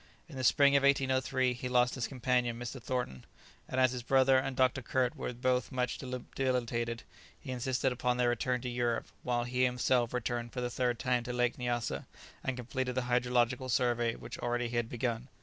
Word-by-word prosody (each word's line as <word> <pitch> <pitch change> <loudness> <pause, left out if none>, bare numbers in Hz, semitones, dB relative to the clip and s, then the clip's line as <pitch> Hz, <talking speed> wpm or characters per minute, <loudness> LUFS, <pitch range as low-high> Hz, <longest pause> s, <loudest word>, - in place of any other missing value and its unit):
In 160 - -11
the 130 - -4
spring 140 +1 +5
of 140 - +5
1803 130 -1 +2
he 125 +1 -5
lost 125 0 +3
his 125 -3 -2
companion 125 -2 0
Mr. 120 +2 -6
Thornton, 120 - -3 0.5
and 130 - -1
as 130 -1 +5
his 125 -1 -4
brother 130 +1 +4
and 135 0 -3
Dr. 130 0 +3
Kirk 125 0 0
were - - -4
both 125 0 0
much 125 -1 -1
debilitated, 125 -2 -2 0.4
he 130 - -7
insisted 130 +1 0
upon 125 0 0
their 125 -1 +3
return 125 +1 0
to 125 - -4
Europe, 120 -1 0 0.2
while 120 -1 0
he 125 +1 0
himself 125 -1 +2
returned 120 -1 -2
for 125 - -3
the 120 0 -2
third 125 -1 0
time 125 +1 +1
to 125 - -3
Lake 125 0 0
Nyassa, 120 -2 -2 0.4
and 130 -1 -2
completed 125 +1 -3
the 130 - 0
hydrographical 125 +1 +1
survey 120 -1 +1
which - - -8
already 120 0 -1
he 120 - -5
had 115 -1 0
begun. 120 0 -2
125 Hz, 195 wpm, -32 LUFS, 120-130 Hz, 0.5 s, spring